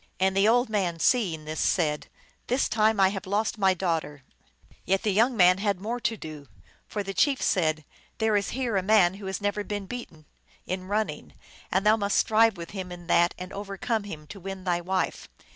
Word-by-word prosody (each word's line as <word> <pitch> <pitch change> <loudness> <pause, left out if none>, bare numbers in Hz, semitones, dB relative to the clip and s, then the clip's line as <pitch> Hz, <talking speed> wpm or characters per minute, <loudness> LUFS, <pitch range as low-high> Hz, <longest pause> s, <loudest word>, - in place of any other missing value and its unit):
And 190 0 +2
the 195 +2 +4
old 245 +3 +4
man, 190 -6 -1
seeing 170 -6 +1
this, 155 0 -5
said, 150 -4 +1 0.2
" - - -36
This 255 +3 +1
time 220 -1 +2
I 190 -1 +6
have 195 -1 -6
lost 215 +3 -1
my 190 -2 +3
daughter! 160 -6 -2 0.3
" 60 - -30
Yet 195 +2 0
the 210 - +1
young 230 +4 +3
man 180 0 +6
had 200 -2 0
more 230 +5 -3
to 225 -1 -1
do; 155 -5 -9 0.4
for 205 - -3
the 195 0 -5
chief 275 +7 +2
said, 155 -4 +1 0.2
" - - -33
There 220 -2 +1
is 200 -1 +1
here 240 -6 0
a - - +2
man 190 -2 +4
who 195 0 -8
has 190 -1 -3
never 205 0 -1
been 205 -1 -4
beaten 185 -9 -8 0.4
in 185 0 -4
running, 210 +2 -3 0.4
and 190 +2 +1
thou 215 +1 +5
must 200 -2 0
strive 220 -1 +4
with 170 -1 -8
him 190 -3 -6
in 175 -1 -9
that 170 0 +3
and 180 +1 -8
overcome 200 +2 -3
him, 155 -7 -8
to 195 +6 -10
win 195 0 -7
thy 175 -2 0
wife." 185 +1 -2
195 Hz, 215 wpm, -27 LUFS, 175-215 Hz, 0.4 s, I